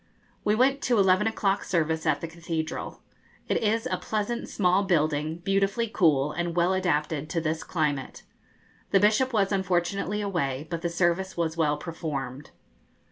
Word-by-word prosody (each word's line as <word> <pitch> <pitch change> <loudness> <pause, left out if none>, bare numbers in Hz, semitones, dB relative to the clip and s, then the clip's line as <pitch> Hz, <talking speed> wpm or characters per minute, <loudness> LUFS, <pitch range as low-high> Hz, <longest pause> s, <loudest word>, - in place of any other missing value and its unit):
We 210 - +2
went 270 +4 +3
to 240 -2 +2
eleven 190 +1 +4
o'clock 200 -3 0
service 160 -2 0
at - - +2
the 165 - -3
cathedral. 165 -1 -5 0.4
It - - +1
is 225 +1 +1
a - - -1
pleasant 220 +2 -3
small 185 0 +2
building, 155 -4 +1
beautifully 195 +4 +1
cool, 150 -9 +2
and 175 0 -3
well 175 +2 +3
adapted 155 -5 0
to 165 - 0
this 160 0 -2
climate. 145 -5 -2 0.7
The 195 - +4
Bishop 215 +6 +3
was 205 -4 +1
unfortunately 190 +1 0
away, 155 -9 -2
but 170 -1 -3
the 170 - -1
service 175 +2 0
was 165 -1 -1
well 150 -3 +1
performed. 150 -4 -5
175 Hz, 155 wpm, -27 LUFS, 160-200 Hz, 0.7 s, eleven